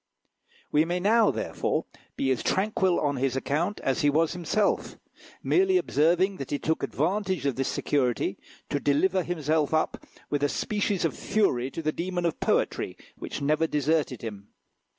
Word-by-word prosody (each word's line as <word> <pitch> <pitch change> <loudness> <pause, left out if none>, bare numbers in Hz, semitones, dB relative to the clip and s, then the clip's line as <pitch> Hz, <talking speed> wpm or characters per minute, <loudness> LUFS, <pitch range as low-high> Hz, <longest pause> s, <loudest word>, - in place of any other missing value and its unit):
We 150 - +4
may 175 +2 -1
now, 215 +4 +4
therefore, - - -1 0.3
be 135 - 0
as 130 - 0
tranquil 190 -2 +1
on 145 -2 0
his 130 0 0
account 160 +9 -1
as 135 - 0
he 145 - +4
was 160 +3 +2
himself, 180 +4 0 0.5
merely 380 0 +3
observing 180 - +2
that 135 - -6
he 145 - 0
took 160 +3 -1
advantage 190 -3 -1
of 140 -3 +1
this 135 0 -1
security 125 -6 0 0.3
to 145 - 0
deliver 180 +7 +2
himself 160 -3 0
up 155 - -1 0.3
with 145 -1 0
a 145 - +2
species 205 -1 -1
of 165 - -1
fury 135 - +1
to 165 - -6
the 155 - +1
demon 175 +1 -3
of 170 - -1
poetry, - - 0 0.2
which 145 - -6
never 155 +3 +2
deserted 150 -4 0
him. 105 -3 -7
160 Hz, 165 wpm, -27 LUFS, 140-185 Hz, 0.5 s, We